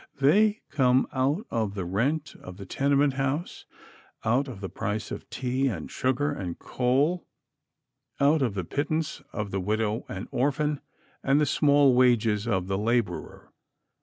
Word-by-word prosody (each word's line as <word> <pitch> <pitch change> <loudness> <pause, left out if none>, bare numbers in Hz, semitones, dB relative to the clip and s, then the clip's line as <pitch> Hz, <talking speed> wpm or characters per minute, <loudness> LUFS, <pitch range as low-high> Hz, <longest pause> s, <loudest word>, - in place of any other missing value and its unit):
They 205 +10 +4
come 130 -2 +3
out 140 - 0
of 110 -3 -1
the 95 -3 -3
rent 135 - -1
of 90 0 -10
the 100 - -8
tenement 140 +6 +2
house; 135 +5 -2 0.6
out 125 +6 +2
of 120 -7 -8
the 95 - -4
price 100 +4 -4
of - - -7
tea 130 +2 -1
and 90 - -4
sugar 130 +3 0
and 95 -11 -5
coal; 140 +8 0 0.9
out 145 +2 +4
of 120 -6 0
the 95 - -2
pittance 155 - -2
of 105 -2 -4
the 95 - -1
widow 110 +3 -1
and 95 0 -5
orphan, 145 +2 0 0.4
and 135 +2 +3
the 150 - +3
small 145 -1 +4
wages 115 -4 +3
of 95 -5 0
the 95 +1 -1
laborer. 115 +1 -2
130 Hz, 155 wpm, -27 LUFS, 105-145 Hz, 0.9 s, They